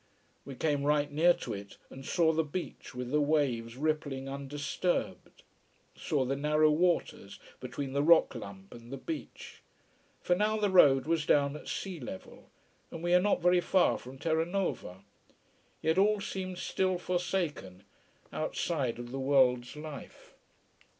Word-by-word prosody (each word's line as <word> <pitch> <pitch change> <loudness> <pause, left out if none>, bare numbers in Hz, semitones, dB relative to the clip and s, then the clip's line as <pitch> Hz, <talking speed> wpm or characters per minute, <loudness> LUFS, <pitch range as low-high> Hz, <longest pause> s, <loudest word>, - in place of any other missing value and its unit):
We 135 0 -8
came 145 +1 0
right 145 0 +1
near 160 +4 +5
to 115 - -6
it, 100 0 -9
and 135 - -10
saw 160 +2 +2
the 160 +1 +1
beach 155 -3 -7
with 125 0 -5
the 150 +1 +3
waves 130 -6 0
rippling 145 -3 -2
undisturbed, 140 +5 -3 0.5
saw 140 -4 -1
the 135 +2 -1
narrow 150 +2 +3
waters 165 - 0 0.2
between 130 +2 -5
the 140 - +1
rock 165 +2 +5
lump 100 -5 -9
and 120 +1 -12
the 135 - -4
beach. 325 - -7 0.6
For 175 - +1
now 210 +3 +1
the 205 -2 +1
road 140 -8 +6
was 160 -1 0
down 140 0 +3
at - - -10
sea 185 -4 -4
level. 110 -8 -9 0.4
And 165 - -8
we 175 - 0
were 180 - +6
not 190 -2 +1
very 180 0 +4
far 185 +1 +2
from 130 +2 -11
Terranova. 160 - -2 0.8
Yet 160 +3 +2
all 210 +1 +3
seemed 185 -2 -5
still 185 0 0
forsaken, 175 - -3 0.5
outside 135 -9 -2
of 120 0 -8
the 135 - -4
world's 130 -2 +2
life. 150 -2 -10
150 Hz, 150 wpm, -31 LUFS, 130-175 Hz, 0.8 s, road